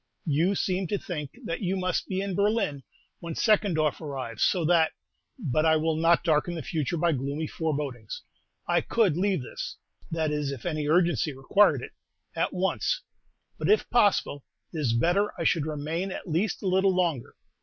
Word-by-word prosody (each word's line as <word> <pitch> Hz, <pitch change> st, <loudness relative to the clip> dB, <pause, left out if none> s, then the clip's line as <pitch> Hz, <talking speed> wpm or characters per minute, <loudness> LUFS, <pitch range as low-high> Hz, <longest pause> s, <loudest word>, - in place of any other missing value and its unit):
You 165 Hz, +6 st, +2 dB
seem 185 Hz, 0 st, 0 dB
to 205 Hz, -, 0 dB
think 150 Hz, -, -6 dB
that 165 Hz, -, -3 dB
you 190 Hz, 0 st, 0 dB
must 185 Hz, -1 st, -1 dB
be 190 Hz, -1 st, -1 dB
in 200 Hz, -1 st, -3 dB
Berlin 200 Hz, -7 st, +1 dB, 0.4 s
when 170 Hz, -2 st, -6 dB
Seckendorf 180 Hz, -, +2 dB
arrives, 130 Hz, -7 st, -5 dB
so 175 Hz, -3 st, +3 dB
that 165 Hz, -1 st, +3 dB, 0.4 s
But 155 Hz, -, 0 dB
I 160 Hz, 0 st, +5 dB
will 160 Hz, 0 st, +1 dB
not 165 Hz, +2 st, +3 dB
darken 165 Hz, +1 st, +1 dB
the 160 Hz, -, -5 dB
future 160 Hz, +2 st, -2 dB
by 170 Hz, +1 st, +2 dB
gloomy 140 Hz, +2 st, -2 dB
forebodings. 145 Hz, -9 st, -4 dB, 0.4 s
I -, -, +3 dB
could 210 Hz, -9 st, +2 dB
leave 185 Hz, -4 st, +1 dB
this -, -, -6 dB, 0.3 s
that 160 Hz, -2 st, -1 dB
is, 150 Hz, -2 st, -1 dB
if 135 Hz, -4 st, -7 dB
any 155 Hz, -4 st, -1 dB
urgency 170 Hz, -1 st, +2 dB
required 135 Hz, +10 st, +3 dB
it -, -, -8 dB, 0.4 s
at -, -, 0 dB
once; -, -, 0 dB, 0.6 s
but, -, -, -1 dB
if 430 Hz, -, +4 dB
possible, 205 Hz, -, +2 dB, 0.3 s
it 160 Hz, -, -3 dB
is 125 Hz, -6 st, +1 dB
better 175 Hz, -, +2 dB
I -, -, -1 dB
should 155 Hz, -3 st, +2 dB
remain 155 Hz, +5 st, -2 dB
at 190 Hz, -, -6 dB
least 175 Hz, +7 st, -1 dB
a -, -, -1 dB
little 190 Hz, 0 st, +3 dB
longer. 170 Hz, -9 st, -1 dB
165 Hz, 175 wpm, -27 LUFS, 150-185 Hz, 0.6 s, I